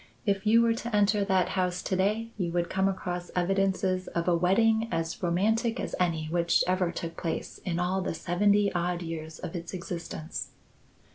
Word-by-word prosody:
If 200 -1 0
you 230 +2 +6
were 230 0 +3
to 230 -1 -3
enter 205 0 +3
that 190 -2 +2
house 180 -1 -1
to 190 - -1
day 215 +5 0
you 180 -4 -2
would 175 -1 0
come 190 0 +2
across 180 -2 -4
evidences 185 0 +1
of 170 0 -2
a 175 - +4
wedding 220 +6 +3
as 165 0 -2
romantic 220 +7 +1
as - - -4
any 165 -3 +1
which 170 +1 +2
ever 185 -1 +1
took 165 -1 -5
place 165 - -4
in 170 -2 -1
all 185 +2 0
the 185 - -2
seventy 200 +4 +2
odd 175 0 -1
years 160 -1 -6
of 165 - -6
its 170 +2 -5
existence. 170 -2 -6
185 Hz, 185 wpm, -28 LUFS, 170-200 Hz, -, you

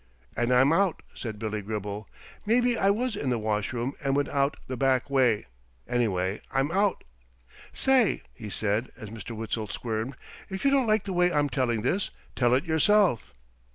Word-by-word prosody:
"And 120 +1 0
I'm 130 +4 +5
out," 190 -1 +1
said 110 -3 -6
Billy 110 -1 -3
Gribble. 105 0 -5 0.3
"Maybe 240 +3 +3
I 195 -3 +2
was 230 +3 0
in 145 -9 -2
the 125 - +1
washroom 110 +4 -1
and 135 -1 +1
went 145 0 +1
out 140 +1 +1
the 130 - -4
back 130 +1 +1
way. 125 - +3 0.4
Anyway, 100 -5 0
I'm 135 +3 +1
out. 200 +2 +1 0.7
Say," 260 -5 +2
he 110 -4 -8
said, 105 +4 -1
as 110 - -8
Mr. 115 +1 -7
Witzel 110 0 -3
squirmed, 115 +4 -3 0.3
"if 190 +6 -5
you 275 - +5
don't 270 -3 +3
like 215 -1 +3
the 195 - -4
way 180 0 +3
I'm 145 -2 +2
telling 120 -6 0
this, 185 +10 0 0.3
tell 120 -1 +3
it 135 - 0
yourself." 165 - +3
130 Hz, 175 wpm, -27 LUFS, 110-185 Hz, 0.7 s, I'm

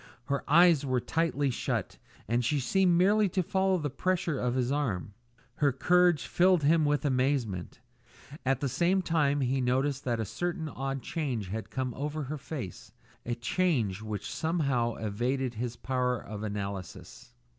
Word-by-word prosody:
Her 140 0 -1
eyes 165 -1 +6
were 130 -2 +1
tightly 145 -1 0
shut, - - -3 0.3
and 120 +3 +1
she 145 +5 +1
seemed 180 +5 +3
merely 205 +3 +4
to 185 +1 0
follow 190 +2 +1
the 150 -4 -3
pressure 170 -1 -1
of 125 0 0
his 130 0 0
arm. 110 -10 -1 0.4
Her 145 -2 +3
courage 175 +5 +3
filled 180 -2 +3
him 155 +2 +4
with 145 +1 +1
amazement. 130 -9 -1 0.6
At 135 0 +1
the 140 - +1
same 180 +8 +1
time 145 -4 +1
he 130 +1 +1
noticed 130 +2 0
that 120 -2 0
a 110 - -1
certain 175 - -3
odd 135 -2 -4
change 130 - -3
had 110 +3 -5
come 130 -2 -3
over 150 +3 -3
her 145 +2 -5
face, 130 - -7 0.4
a 120 - -1
change 120 - 0
which 105 -2 -5
somehow 140 -8 0
evaded 120 +4 -2
his 120 +1 -4
power 125 -1 -1
of 105 -2 -8
analysis. 100 -3 -6
135 Hz, 160 wpm, -29 LUFS, 120-160 Hz, 0.6 s, eyes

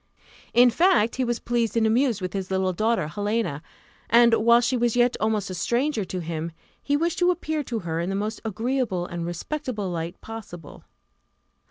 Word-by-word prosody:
In 245 0 +7
fact, 330 - +3
he 260 - +1
was 240 -1 0
pleased 235 -1 -1
and 225 - +3
amused 230 -1 +2
with 185 - -4
his 195 -2 -3
little 190 -1 0
daughter, 220 -3 0
Helena; 205 -3 -2 0.5
and 235 0 +6
whilst 235 +2 +4
she 255 - +1
was 240 -1 +1
yet 245 0 +3
almost 215 -3 0
a - - -4
stranger 235 - 0
to 180 0 -4
him, 165 0 -4 0.3
he 285 0 +1
wished 335 +2 -1
to 355 0 +4
appear 315 -3 -1
to 235 - -3
her 165 -5 -3
in 170 +2 -2
the 195 - -2
most 210 +2 -3
agreeable 225 -3 -1
and 170 -1 -5
respectable 210 - -4
light 165 0 -4
possible. 200 -8 -10
220 Hz, 185 wpm, -25 LUFS, 185-240 Hz, 0.5 s, In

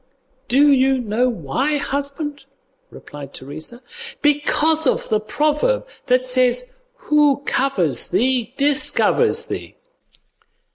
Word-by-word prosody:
"Do 285 +4 +4
you 265 0 +3
know 245 +1 0
why, 245 - -2
husband?" 285 +1 -4 0.4
replied 140 -2 -11
Teresa; 155 - -7 0.4
"because 300 +1 +2
of - - 0
the 215 - +2
proverb 300 - 0 0.2
that 255 0 +2
says 255 - +1 0.2
'who 295 -2 +1
covers 185 - 0
thee, 250 -2 0
discovers 295 - +2
thee. - - -7
270 Hz, 100 wpm, -20 LUFS, 240-295 Hz, 0.4 s, Do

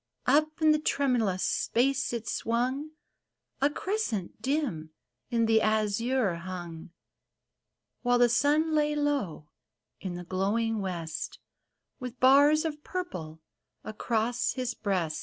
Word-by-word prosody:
Up 310 +1 +2
in 310 - +7
the 305 - +3
tremulous 245 -11 +1
space 270 +3 +1
it 235 -2 -4
swung, 255 +6 -1 0.4
— - - -47
A 280 - +4
crescent 295 - -3
dim 255 - -1 0.4
in 230 -1 +2
the 225 0 +4
azure 215 -1 +1
hung; 170 -2 -7 1.1
While 245 0 +3
the 245 0 +6
sun 295 +6 +2
lay 300 -1 +2
low 275 - -1 0.5
in 185 -2 -5
the 175 - -6
glowing 210 +5 0
west, 170 -4 -4 0.6
With 250 -1 -7
bars 285 +4 +6
of 300 -2 -4
purple 165 - -5 0.4
across 225 +2 -1
his 255 -1 -2
breast. 185 -8 -1
235 Hz, 120 wpm, -29 LUFS, 190-285 Hz, 1.1 s, in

